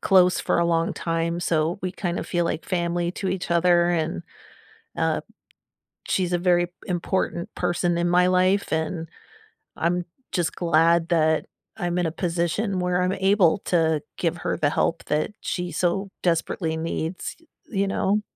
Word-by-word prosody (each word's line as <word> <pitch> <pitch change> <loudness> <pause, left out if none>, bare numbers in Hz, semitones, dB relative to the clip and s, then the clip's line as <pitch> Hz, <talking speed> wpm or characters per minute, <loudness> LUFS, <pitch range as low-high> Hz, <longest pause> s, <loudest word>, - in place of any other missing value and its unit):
close 185 -2 +5
for - - +1
a 170 - +3
long 165 0 +1
time, 165 0 -1
so 165 0 0
we 185 - -1
kinda 175 -2 -3
feel 175 -1 -1
like 170 -1 -2
family 175 -1 -1
to 190 - -3
each 185 -1 -3
other, 175 0 +4
and, 155 - -1 0.7
uh, - - 0 0.9
she's 180 -2 0
a - - +3
very 175 -1 +3 0.2
important 175 -1 -2
person 175 0 0
in 175 0 +1
my 180 +1 +4
life, 185 +2 +2
and 160 +1 -1 0.7
I'm 175 +2 0 0.3
just 175 -3 0
glad 165 0 +3
that 160 -2 +2 0.3
I'm 175 0 -1
in 175 - +1
a 160 - -2
position 175 +4 -1
where 180 0 +1
I'm 180 +1 +1
able 190 -2 +3
to 160 -4 +2 0.2
give 170 0 0
her - - -2
the 145 - +2
help 165 +2 0
that 150 +5 0
she 180 -1 -3
so 185 +5 0
desperately 165 -1 0
needs, 165 +2 -3
y 330 - -25 0.3
you 200 - +3
know? 200 +2 +1
175 Hz, 160 wpm, -24 LUFS, 165-180 Hz, 0.9 s, close